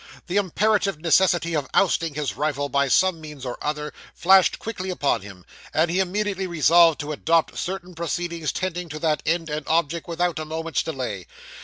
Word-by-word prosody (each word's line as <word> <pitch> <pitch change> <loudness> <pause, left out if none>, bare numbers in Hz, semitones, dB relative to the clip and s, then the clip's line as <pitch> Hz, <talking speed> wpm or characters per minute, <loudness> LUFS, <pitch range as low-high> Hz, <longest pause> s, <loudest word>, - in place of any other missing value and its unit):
The 185 +2 -2
imperative 200 -1 +1
necessity 170 0 +2
of 145 -3 -2
ousting 165 -5 +2
his 150 -2 -2
rival 145 -1 -1
by 140 +1 +2
some 175 +4 +2
means 150 -4 -9
or 125 - -5
other, 150 0 -3 0.2
flashed 190 +1 +5
quickly 195 -4 -5
upon 145 - 0
him, 95 -3 -12 0.3
and 160 +2 +2
he 180 - 0
immediately 190 0 -1
resolved 170 0 +5
to 145 +1 -5
adopt 165 +2 +1
certain 185 0 -5
proceedings 170 -1 -3
tending 180 -2 -3
to 155 - -6
that 155 -1 0
end 165 +1 +1
and 150 0 -3
object, 165 0 0
without 175 -1 -1
a - - -3
moment's 160 +1 -2
delay. 125 - -5
165 Hz, 175 wpm, -23 LUFS, 150-180 Hz, 0.3 s, flashed